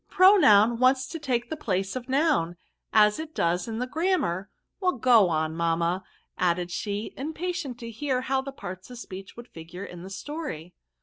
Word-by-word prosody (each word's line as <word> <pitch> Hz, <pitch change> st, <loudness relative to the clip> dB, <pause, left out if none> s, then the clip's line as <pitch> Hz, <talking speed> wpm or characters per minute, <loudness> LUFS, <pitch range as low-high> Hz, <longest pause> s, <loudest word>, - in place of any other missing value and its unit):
Pronoun 235 Hz, -, +6 dB
wants 260 Hz, +1 st, +4 dB
to 325 Hz, +5 st, -7 dB
take 245 Hz, -4 st, -2 dB
the -, -, -1 dB
place 195 Hz, -8 st, -2 dB
of 255 Hz, 0 st, -6 dB
Noun, 270 Hz, -, +2 dB, 0.4 s
as 210 Hz, +2 st, +5 dB
it 315 Hz, 0 st, -7 dB
does 175 Hz, +3 st, 0 dB
in 225 Hz, -1 st, -4 dB
the 250 Hz, -, -1 dB
grammar; 270 Hz, -, 0 dB, 0.3 s
well, 365 Hz, -2 st, +2 dB
go 230 Hz, -6 st, +5 dB
on, 160 Hz, -1 st, -1 dB
mamma," 170 Hz, +2 st, 0 dB, 0.4 s
added 175 Hz, 0 st, +1 dB
she, 205 Hz, +4 st, -3 dB
impatient 320 Hz, -2 st, -4 dB
to 230 Hz, 0 st, -6 dB
hear 255 Hz, +2 st, -1 dB
how 265 Hz, +1 st, 0 dB
the 275 Hz, +1 st, -7 dB
parts 185 Hz, -7 st, -8 dB
of 245 Hz, -, -9 dB
speech 195 Hz, -4 st, -9 dB
would 240 Hz, 0 st, -9 dB
figure 170 Hz, +4 st, -9 dB
in 175 Hz, -3 st, -10 dB
the 185 Hz, -, -8 dB
story. 195 Hz, -, -6 dB
230 Hz, 180 wpm, -26 LUFS, 180-275 Hz, 0.4 s, Pronoun